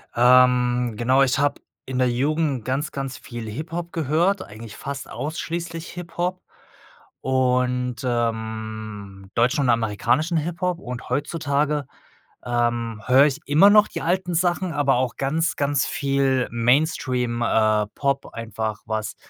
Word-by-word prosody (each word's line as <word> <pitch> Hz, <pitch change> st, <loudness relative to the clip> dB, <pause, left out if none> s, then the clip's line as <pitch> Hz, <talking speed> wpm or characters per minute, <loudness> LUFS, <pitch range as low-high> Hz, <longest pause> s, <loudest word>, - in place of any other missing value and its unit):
Ähm, 125 Hz, -1 st, +4 dB
genau, 130 Hz, +4 st, +3 dB
ich 135 Hz, -2 st, +3 dB
habe 145 Hz, +1 st, 0 dB, 0.2 s
in 130 Hz, -1 st, -3 dB
der 125 Hz, -, +3 dB
Jugend 140 Hz, 0 st, 0 dB
ganz, 140 Hz, +4 st, -1 dB
ganz 135 Hz, -2 st, -5 dB
viel 120 Hz, -2 st, -7 dB
Hip-Hop 165 Hz, +8 st, -5 dB
gehört, 165 Hz, +6 st, +1 dB
eigentlich 110 Hz, 0 st, -11 dB
fast 140 Hz, -1 st, -6 dB
ausschließlich 165 Hz, +4 st, -4 dB
Hip 175 Hz, -1 st, -9 dB
Hop 180 Hz, +1 st, -1 dB, 0.8 s
und, 125 Hz, -1 st, +1 dB
ähm, 110 Hz, -4 st, -4 dB
deutschen 125 Hz, +5 st, +2 dB
und 130 Hz, -, +1 dB
amerikanischen 120 Hz, -, +1 dB
Hip-Hop 175 Hz, +2 st, -2 dB
und 125 Hz, -4 st, -7 dB
heutzutage, 145 Hz, -1 st, 0 dB, 0.6 s
ähm, 120 Hz, -2 st, -1 dB
höre 130 Hz, +2 st, +6 dB
ich 145 Hz, -1 st, -1 dB
immer 160 Hz, +8 st, +6 dB
noch 210 Hz, 0 st, +6 dB
die -, -, -5 dB
alten 180 Hz, +1 st, 0 dB
Sachen, 175 Hz, +1 st, +1 dB
aber 140 Hz, -3 st, +2 dB
auch 125 Hz, 0 st, -1 dB
ganz, 155 Hz, +5 st, 0 dB
ganz 140 Hz, -1 st, +1 dB
viel 135 Hz, -2 st, +1 dB
Mainstream, 125 Hz, -1 st, +1 dB
äh, 110 Hz, -2 st, +2 dB
Pop 140 Hz, -1 st, -1 dB
einfach 110 Hz, -2 st, -4 dB
was 110 Hz, -1 st, -3 dB
130 Hz, 135 wpm, -23 LUFS, 120-155 Hz, 0.8 s, höre